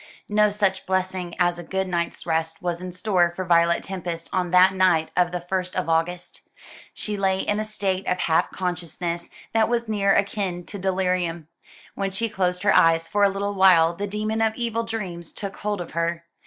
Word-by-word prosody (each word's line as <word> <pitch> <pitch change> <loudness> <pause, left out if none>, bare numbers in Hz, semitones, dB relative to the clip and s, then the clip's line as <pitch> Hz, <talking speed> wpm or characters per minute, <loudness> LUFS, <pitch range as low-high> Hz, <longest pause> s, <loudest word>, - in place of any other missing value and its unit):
No 210 0 +4
such 200 -2 -1
blessing 185 -1 -2
as 175 -1 +2
a - - -6
good 190 +2 -2
night's 170 -2 -2
rest 160 0 -1
was 175 -1 -3
in 185 0 -5
store 180 -1 +1
for 185 - -3
Violet 170 0 +3
Tempest 175 -3 -5
on 180 -1 0
that 185 +2 +6
night 180 -4 +2
of 180 -1 +2
the 180 - -2
first 185 +1 -3
of 185 -2 -1
August. 165 +2 -1 0.5
She 210 - -5
lay 190 -1 +1
in 205 0 -1
a - - 0
state 195 -3 -2
of 180 - +1
half 165 -3 +2
consciousness 175 -1 -4 0.2
that 225 0 +3
was 235 -1 0
near 200 -2 +2
akin 195 -3 -1
to 200 - -8
delirium. 180 -4 -1 0.4
When 195 -1 -2
she 220 +4 -2
closed 180 -3 -1
her 205 - +4
eyes 165 0 +4
for 205 0 +1
a 200 - +6
little 200 +1 -2
while 180 -4 +5
the 205 +4 -3
demon 215 +2 -2
of 220 -1 +2
evil 230 -2 -1
dreams 190 -7 -5
took 195 -2 -6
hold 205 -1 -2
of 175 - -6
her. 170 0 -2
185 Hz, 195 wpm, -24 LUFS, 175-200 Hz, 0.5 s, that